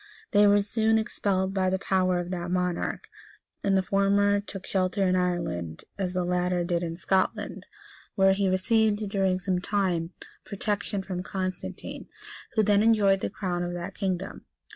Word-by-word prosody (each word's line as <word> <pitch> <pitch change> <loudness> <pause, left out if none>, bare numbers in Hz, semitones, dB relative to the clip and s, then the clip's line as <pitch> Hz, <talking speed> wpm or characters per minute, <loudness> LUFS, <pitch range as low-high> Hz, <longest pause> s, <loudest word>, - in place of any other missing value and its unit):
They 205 -1 +6
were 205 0 +5
soon 220 +2 +2
expelled 195 -3 -1
by 190 -1 +1
the 190 - +1
power 185 -1 +1
of 175 0 -3
that 175 -1 -3
monarch; 180 -1 -1 0.6
and 195 -1 +3
the 190 - +2
former 200 +1 +3
took 195 -2 -8
shelter 190 +1 0
in 185 -1 +2
Ireland, 170 - -2
as 185 -2 -2
the 180 -1 0
latter 180 0 0
did 170 -1 0
in 165 -1 -4
Scotland, 190 +1 -1 0.5
where 195 0 +5
he 195 0 +1
received, 210 +2 +2
during 190 -2 +1
some 185 -1 -1
time, 185 -4 -1 0.3
protection 200 -1 -2
from 185 -2 -4
Constantine, 185 -1 -5 0.5
who 220 - +4
then 205 0 +4
enjoyed 210 -3 +4
the - - -2
crown 180 -3 -3
of 175 0 -3
that 175 +3 -5
kingdom. 190 -1 -3
190 Hz, 165 wpm, -27 LUFS, 180-200 Hz, 0.6 s, They